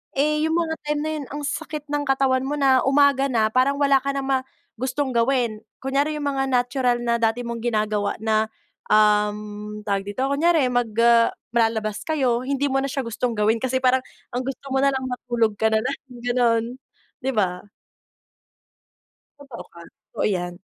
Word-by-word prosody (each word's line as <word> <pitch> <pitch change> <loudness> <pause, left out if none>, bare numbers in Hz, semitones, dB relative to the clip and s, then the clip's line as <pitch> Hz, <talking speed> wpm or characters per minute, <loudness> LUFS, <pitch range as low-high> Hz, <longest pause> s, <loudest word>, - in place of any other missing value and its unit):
Eh, 300 +2 +1
yung 320 - 0
mga 330 -2 0
time 295 0 -1
na 315 - -2
yon 285 - -6
ang 290 - -5
sakit 295 +1 -4
ng 290 0 0
katawan 265 -1 +2
mo 285 +2 -2
na 265 -2 +5
umaga 275 0 +4
na 220 -2 +3
parang 260 +3 +2
wala 280 -1 +4
ka 275 - 0
na 275 - -2
ma 270 0 +1 0.4
gustong 260 +3 -2
gawin. 235 -2 +1 0.2
Kunyari 280 +3 0
yung 290 - -2
mga 270 -1 0
natural 245 0 +1
na 235 0 +1
dati 230 +1 +1
mong 235 0 -4
ginagawa 215 -3 0
na, 220 0 +2 0.4
uhm, 210 0 +1
tawag 200 -1 0
dito 205 +6 -3
kunyari 295 0 +3
mag, 245 -2 0
ah, 235 -1 +5 0.2
lalabas 220 -2 0
kayo 255 -6 0
hindi 280 +1 0
mo 270 0 0
na 275 - -2
siya 275 - -3
gustong 235 +2 -2
gawin 220 +2 +2
kasi 260 0 0
parang 255 0 +2 0.3
ang 255 - -1
gusto 270 +1 -6
mo 265 - +2
na 275 - +4
lang 260 -1 -3
matulog 240 -3 -1
ka 220 +1 +1
na 220 - +3
lang 255 +5 -2 0.2
ganon, 240 -2 +2 0.6
diba? 205 -8 -1 1.7
Totoo 275 -4 -10
ka. 170 - -13 0.4
Oo - - 0
yan. 180 -3 -1
255 Hz, 175 wpm, -23 LUFS, 220-275 Hz, 1.7 s, na